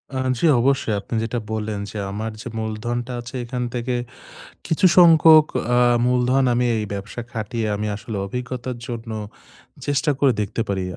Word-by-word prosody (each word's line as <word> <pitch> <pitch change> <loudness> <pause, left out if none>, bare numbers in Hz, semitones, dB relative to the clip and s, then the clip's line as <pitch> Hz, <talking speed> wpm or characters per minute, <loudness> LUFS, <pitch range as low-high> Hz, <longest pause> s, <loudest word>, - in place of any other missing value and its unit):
আ - - -1 0.2
জি - - +1 0.2
অবশ্যই। 135 -4 +1
আপনি 110 - -6
যেটা 120 +2 -2
বললেন 110 -1 -3
যে - - -7
আমার 110 +2 -4
যে - - -7
মূলধনটা 120 +3 -3
আছে 125 +2 -10
এখান 125 +1 -3
থেকে 125 +1 -2 0.7
কিছু 175 +4 +3
সংখ্যক, 160 -2 +8 0.3
আ - - +4 0.3
মূলধন 125 +2 +2
আমি 125 +1 +2
এই 110 - -1
ব্যবসা 100 +4 -6
খাটিয়ে 110 0 -3
আমি 105 +1 -3
আসলে 110 0 -6
অভিজ্ঞতার 125 +2 -5
জন্য 115 -1 -6 0.8
চেষ্টা 145 +1 +1
করে 140 -2 +4
দেখতে 105 +2 -3
পারি। 95 -2 -1
120 Hz, 160 wpm, -22 LUFS, 110-130 Hz, 0.8 s, সংখ্যক